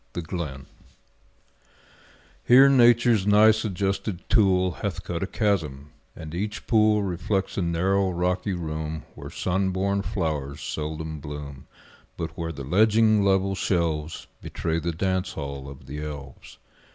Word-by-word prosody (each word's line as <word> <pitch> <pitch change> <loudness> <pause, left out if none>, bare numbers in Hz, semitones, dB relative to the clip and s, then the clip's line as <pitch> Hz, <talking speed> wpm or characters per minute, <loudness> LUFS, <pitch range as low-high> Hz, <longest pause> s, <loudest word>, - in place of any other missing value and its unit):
The 85 - -4
Glen 75 -6 -5 1.8
Here 130 +3 +8
Nature's 120 -5 +5
nice 110 +1 +5
adjusted 95 -1 -2
tool 95 -4 +4
Hath - - -3
cut 85 -1 -4
a 95 - -1
chasm; 80 - -1 0.2
and 80 -1 -9
each 105 +4 -4
pool 110 -2 +3
Reflects 95 +1 -2
a - - -1
narrow, 95 +3 +1
rocky 90 +2 -1
room 80 -2 -4
Where - - -9
sun 95 +1 -1
born 100 +2 0
flowers 80 -9 -3
seldom 80 0 -4
bloom, 75 -2 -8 0.5
But 80 -1 -5
where 80 -1 -4
the 70 -3 -7
ledging, 110 - +4
level 95 0 +2
shelves 85 -5 -1 0.2
Betray 80 0 -2
the 85 +2 -2
dance 95 +2 -1
hall 70 -2 -6
of 70 0 -12
the 75 +3 -6
elves. 70 -4 -9
90 Hz, 135 wpm, -25 LUFS, 80-100 Hz, 1.8 s, Here